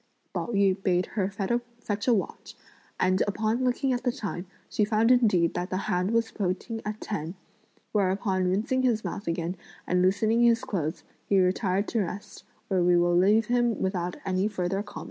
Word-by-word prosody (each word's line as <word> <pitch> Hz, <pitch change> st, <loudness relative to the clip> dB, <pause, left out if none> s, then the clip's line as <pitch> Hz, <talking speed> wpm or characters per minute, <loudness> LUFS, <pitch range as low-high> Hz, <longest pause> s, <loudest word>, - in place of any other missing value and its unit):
Pao -, -, -2 dB
yü 200 Hz, -4 st, +2 dB
bade 180 Hz, -1 st, +2 dB
her 195 Hz, -3 st, 0 dB
fetch 230 Hz, +1 st, -3 dB
a 245 Hz, -, +5 dB
watch, 195 Hz, -, -4 dB, 0.4 s
and 185 Hz, +1 st, +2 dB
upon 220 Hz, +4 st, 0 dB
looking 255 Hz, +1 st, +1 dB
at 245 Hz, -, -1 dB
the 245 Hz, -, +1 dB
time, 190 Hz, -5 st, -5 dB, 0.2 s
he 210 Hz, -, 0 dB
found 220 Hz, +3 st, +3 dB
indeed 205 Hz, -9 st, +4 dB
that 180 Hz, +1 st, -3 dB
the 185 Hz, -, -1 dB
hand 180 Hz, +2 st, 0 dB
was 230 Hz, 0 st, +1 dB
pointing 205 Hz, +3 st, -3 dB
at 210 Hz, 0 st, -4 dB
ten; 175 Hz, -4 st, -4 dB, 0.6 s
whereupon 190 Hz, -1 st, +1 dB
rinsing 225 Hz, +8 st, +1 dB
his 235 Hz, -4 st, +1 dB
mouth 200 Hz, -, -5 dB
again 170 Hz, +1 st, -2 dB, 0.3 s
and 180 Hz, 0 st, +1 dB
loosening 215 Hz, +5 st, +2 dB
his 235 Hz, -1 st, +4 dB
clothes, 160 Hz, -6 st, -3 dB, 0.3 s
he 195 Hz, -, +4 dB
retired 190 Hz, +1 st, +1 dB
to 230 Hz, -, 0 dB
rest, 195 Hz, +2 st, -6 dB, 0.2 s
where 190 Hz, -2 st, +1 dB
we 175 Hz, 0 st, +4 dB
will 175 Hz, 0 st, +3 dB
leave 205 Hz, +5 st, +4 dB
him 240 Hz, -2 st, +1 dB
without 180 Hz, -2 st, -1 dB
any 190 Hz, +1 st, +1 dB
further 195 Hz, -1 st, -2 dB
comment. 205 Hz, 0 st, -9 dB
200 Hz, 180 wpm, -27 LUFS, 185-225 Hz, 0.6 s, a